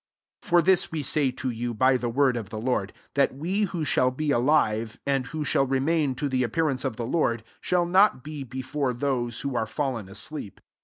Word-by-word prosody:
15 - - -10
For 175 0 +6
this 185 +1 +3
we 155 -2 -3
say 140 0 +2
to 130 0 -3
you, 120 0 -4
by 130 +3 +4
the 120 -1 -1
word 130 +1 +2
of 110 -5 -5
the 110 - -6
Lord, 110 -4 -1 0.2
that 140 -2 +2
we 185 +9 0
who 175 -3 -4
9^aU 130 -2 +2
be 155 -1 0
alive, 120 -5 +2
and 135 -2 0
who 155 +1 -4
Bhall 135 -1 +1
remain 140 +1 +1
to 145 - -2
the 130 -2 0
appearance 130 +2 0
of 135 -5 -2
the 120 0 -4
Lord, 120 -5 0 0.2
shall 180 -1 +1
not 185 - +4
be 150 -2 -6
before 130 +1 -3
those 120 -2 -2
who 140 -2 -3
are 110 -2 0
fallen 120 -5 -3
asleep. 105 - -6
130 Hz, 210 wpm, -26 LUFS, 120-150 Hz, 0.2 s, For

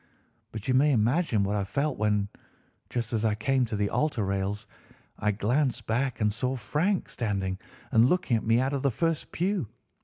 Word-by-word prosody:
But 110 -2 -7
you 130 - +2
may 145 +3 +4
imagine 120 - +2
what 100 +1 0
I 100 - 0
felt 140 +9 -1
when, 105 -1 +1 0.6
just 120 -2 -3
as 110 -1 0
I 110 -2 +2
came 125 +4 +1
to 110 - -3
the 100 0 0
altar 125 -4 0
rails, 100 +2 -2 0.5
I 105 - +1
glanced 120 +6 0
back 120 +2 -1
and 105 -1 +2
saw 125 +4 -1
Frank 165 - 0
standing 95 -5 -2 0.3
and 115 +3 +5
looking 180 -9 +2
at 110 - 0
me 115 +1 +3
out 135 +2 0
of 140 - -1
the 140 - +2
first 165 +5 -1
pew. 185 - -1
115 Hz, 190 wpm, -28 LUFS, 105-140 Hz, 0.6 s, and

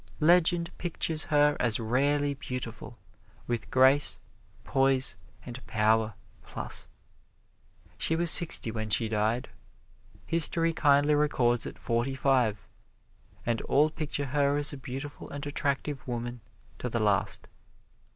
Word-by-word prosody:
Legend 170 +1 +2
pictures 160 -2 -1
her 150 -1 +3
as 115 -2 +1
rarely 140 +5 0
beautiful, 125 -4 -7 0.5
with 120 -1 -4
grace, 130 +3 +3 0.4
poise 135 -1 +1 0.3
and 125 +1 -9
power, 110 -1 +1 0.3
plus. - - -6 1.1
She 160 - +2
was 170 -1 +3
sixty 165 -9 +6
when 110 -1 -5
she 115 +2 +2
died. 110 +3 -1 0.8
History 165 0 +5
kindly 145 -1 +3
records 125 -5 +1
it - - -9
forty 120 +3 -2
five 125 -6 0 0.8
and 115 -1 -1
all 150 +2 +2
picture 145 -2 -3
her 140 +1 0
as 145 +1 -2
a - - -7
beautiful 135 +2 -8
and 145 +1 -7
attractive 145 -1 -3
woman 120 0 -5 0.4
to - - -4
the - - -2
last. - - 0
135 Hz, 120 wpm, -28 LUFS, 120-145 Hz, 1.1 s, sixty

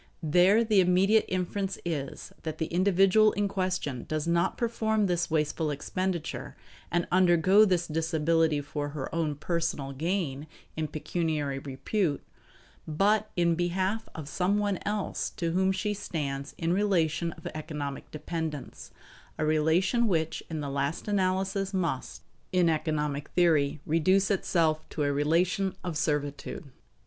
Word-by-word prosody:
There 180 +8 +5
the 215 -3 +3
immediate 190 +4 +4
inference 190 +1 -2
is 145 -5 -4
that 160 -1 -5
the 160 - -1
individual 195 +4 +4
in 205 0 0
question 185 -10 -2
does 155 -1 -2
not 170 +2 +1
perform 220 -2 +1
this 175 -2 0
wasteful 155 0 0
expenditure 170 +3 -3 0.3
and 175 0 0
undergo 185 +3 +5
this 180 -3 +1
disability 160 -1 +1
for 145 0 -4
her 135 - -5
own 160 -3 0
personal 155 -3 -2
gain 155 -2 -2 0.3
in 155 -1 -2
pecuniary 155 -3 -2
repute, 145 +4 -2 0.6
but 205 +7 +2
in 170 -1 +3
behalf 185 +5 -1
of 155 -3 -6
some 185 +6 +1
one 205 -3 0
else 210 -1 -2
to 170 -1 -1
whom 190 +2 +2
she 210 +2 -1
stands 140 -8 -4
in 165 0 -1
a - - +3
relation 170 -4 +1
of 160 - -16
economic 150 -3 -5
dependence; 155 -2 -5 0.5
a 155 - 0
relation 160 +10 +2
which 160 -5 0
in 160 -2 -3
the 145 - -3
last 140 +6 -2
analysis 195 0 0
must, 165 -8 -2 0.3
in 180 -2 +3
economic 150 -2 -1
theory, 155 -5 +3
reduce 185 +6 +3
itself 165 -5 +1
to 150 - -2
a 145 0 +1
relation 170 +6 +1
of 175 -3 -3
servitude. 145 +2 -2
170 Hz, 140 wpm, -28 LUFS, 150-190 Hz, 0.6 s, There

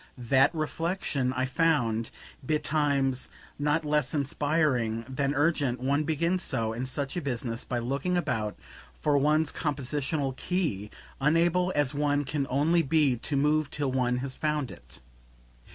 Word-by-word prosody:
That 130 +2 +4
reflexion 155 -4 -1
I 130 0 0
found, 125 -6 +1 0.3
betimes, 140 -3 +1 0.3
not 150 +2 +1
less 150 -2 +1
inspiring 140 -5 0
than 140 +2 -1
urgent; 145 -4 +1
one 140 +4 +1
begins 170 +4 0
so, 115 -8 -1
in 125 +3 -3
such 140 +4 -3
a 175 - -1
business, 120 -4 -3
by 125 - -2
looking 140 +9 -1
about 110 -11 -1 0.4
for 150 -1 +2
one's 150 +2 +2
compositional 145 -1 -2
key, 140 - -2 0.3
unable 170 +5 +3
as 145 -2 +1
one 145 0 +1
can 140 0 -2
only 155 +6 +3
be 150 -3 +3
to 140 +5 -3
move 150 +1 +2
till 145 -3 -1
one 125 -1 +1
has 135 - -5
found 150 -4 -1
it. - - -14
145 Hz, 140 wpm, -28 LUFS, 130-155 Hz, 0.4 s, That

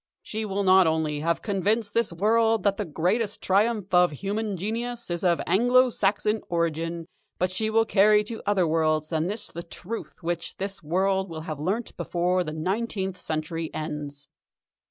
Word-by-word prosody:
She 220 0 -4
will 200 0 -1
not 185 -2 +6
only 160 -2 0
have 165 +2 -1
convinced 205 +1 0
this 230 -4 +1
world 225 +5 +2
that 200 -1 +2
the 210 - -2
greatest 190 +7 0
triumph 205 0 +1
of 180 0 +6
human 200 +6 -3
genius 230 +3 -4
is 170 +1 -3
of 175 -2 +3
Anglo 245 +4 +4
Saxon 210 +1 +1
origin, 165 0 -1 0.3
but 185 0 0
she 215 +4 -1
will 225 +1 +3
carry 210 0 +5
to 225 +1 -6
other 200 -3 +3
worlds 155 -1 +1
than 160 0 0
this 210 +4 -3
the 170 - -6
truth 180 +6 -7
which 170 0 -3
this 195 -1 -4
world 190 +4 0
will 160 -1 -6
have 155 -2 -6
learnt 200 +9 -2
before 180 +1 0
the 155 - -5
nineteenth 190 +3 -2
century 160 +1 -3
ends. 145 -2 -5
190 Hz, 170 wpm, -26 LUFS, 165-215 Hz, 0.3 s, not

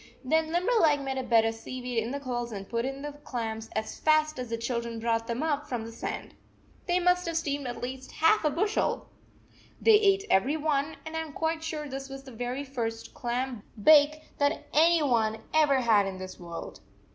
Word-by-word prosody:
Then 315 +4 +1
Limberleg 345 - +3
made 265 -1 -2
a - - -2
bed 230 -2 +4
of 225 - +1
seaweed 245 +1 -4
in 225 +1 -2
the 280 +2 -3
coals 240 -3 -3
and 195 -2 -6
put 235 0 -1
in 270 +1 -4
the 295 - -4
clams 225 -2 -4
as 220 0 -3
fast 310 -2 +3
as 250 -2 -4
the 230 - -2
children 235 -1 -3
brought 230 0 0
them 235 +4 -2
up 295 -2 -1
from 240 -4 -3
the 230 - -8
sand. 230 - -5 0.5
They 355 0 +3
must 360 0 +2
have 330 -1 -1
steamed 285 -4 -2
at 245 - -6
least 260 +1 -6
half 330 +6 +4
a 305 - +3
bushel! 410 +8 0 0.7
They 455 - +5
ate 395 -1 +3
every 265 +11 +3
one, 300 0 0
and 315 0 -6
I - - 0
am 320 -2 -6
quite 320 +1 -1
sure 310 -2 -4
this 270 0 -6
was 270 0 -8
the 265 - -11
very 245 +4 -3
first 230 -5 -4
clam 245 -1 -3 0.2
bake 305 +5 +6 0.2
that 285 0 +1
any 330 +1 +5
one 225 -5 +2 0.2
ever 295 -4 +4
had 215 -4 +4
in 190 -1 -5
this 185 0 -8
world. 170 -1 -8
270 Hz, 205 wpm, -28 LUFS, 235-310 Hz, 0.7 s, bake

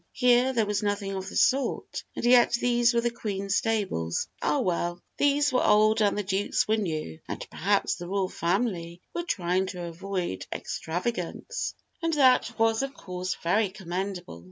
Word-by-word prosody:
Here 250 +1 +4
there 230 -4 +1
was 205 0 -1
nothing 205 -1 -1
of 190 0 -4
the - - -10
sort, 270 +1 +1
and - - -3
yet 240 -1 +6
these 240 0 +3
were 235 -1 +2
the 240 0 0
Queen's 200 -4 -2
stables. 195 - -1
Ah, 150 - +1
well! 175 -1 -1 0.2
these 285 0 +3
were 255 - +3
old 215 +1 +4
and 205 -1 +2
the 210 - 0
Duke's 195 +1 0
were 215 - +3
new, 155 - -3
and - - -5
perhaps - - +1
the 175 - -7
royal 195 0 0
family 175 -2 -1
were 345 - -1
trying 185 - 0
to 180 -1 -6
avoid 175 - -4
extravagance, 235 - -3 0.3
and 330 -1 0
that 260 -3 +4
was 225 0 +3
of 275 0 -4
course 180 0 -4
very 200 +5 +2
commendable. 185 - -5
200 Hz, 170 wpm, -27 LUFS, 180-240 Hz, 0.3 s, yet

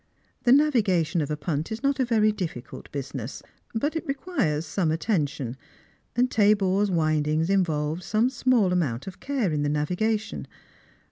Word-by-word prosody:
The 240 - +5
navigation 205 - +3
of 145 - -2
a 150 - -2
puut 150 +2 -3
is 220 +4 -5
not 275 0 +1
a 260 - +3
very 220 -3 +3
difficult 170 - -6
business; 135 -3 -5 0.3
but 290 +8 0
it 320 - -3
requires 265 - -1
some 165 +1 0
attention, 150 - -1 0.6
and 250 +1 +2
Tabor's 205 -1 +3
windings 155 0 +1
involved 160 -4 +1
some 220 +7 +1
small 240 -7 +2
amount 145 -8 -1
of 190 -2 -8
care 265 - -1
in 150 -1 0
the 145 - 0
navigation. 205 +9 -1
185 Hz, 150 wpm, -26 LUFS, 150-225 Hz, 0.6 s, The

